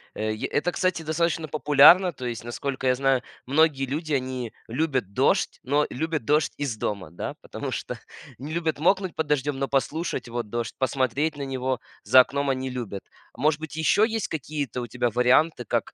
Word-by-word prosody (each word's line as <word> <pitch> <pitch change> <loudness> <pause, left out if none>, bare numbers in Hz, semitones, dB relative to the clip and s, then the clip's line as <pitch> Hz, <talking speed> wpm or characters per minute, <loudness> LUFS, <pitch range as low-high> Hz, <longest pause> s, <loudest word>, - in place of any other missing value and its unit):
Э, 110 0 -1
е 110 - -4
это, 180 +5 0
кстати, 185 -3 0
достаточно 160 0 0
популярно, 150 +6 +6
то 130 -4 -8
есть, 120 -2 -4
насколько 130 +2 -3
я 125 - +4
знаю, 135 -1 +2 0.2
многие 140 0 +3
люди, 155 +4 -4
они 130 -3 -2 0.2
любят 130 -5 -1
дождь, - - +2
но 145 +3 +2
любят 155 -2 -3
дождь 150 +4 +2
из 140 -6 -2
дома, 100 -6 -3
да? 85 - -5
Потому - - -6
что - - -4 0.4
не 140 +5 -7
любят 165 -1 -1
мокнуть 185 +2 +2
под 160 - -1
дождём, 145 -1 0
но 135 0 -1
послушать 140 0 -1
вот 120 -2 -4
дождь, 120 0 -3
посмотреть 135 +3 0
на 140 - -4
него 130 -1 -2 0.2
за 130 - +7
окном 140 +2 -1
они 130 0 -1
любят. 120 -6 -5 0.4
Может 150 +3 +2
быть 160 -1 -7
ещё 160 +6 +3
есть 225 -1 0
какие-то 145 -5 -4
у 120 - -5
тебя 125 0 -1
варианты, 125 +5 +3
как - - -1
135 Hz, 185 wpm, -25 LUFS, 125-155 Hz, 0.4 s, за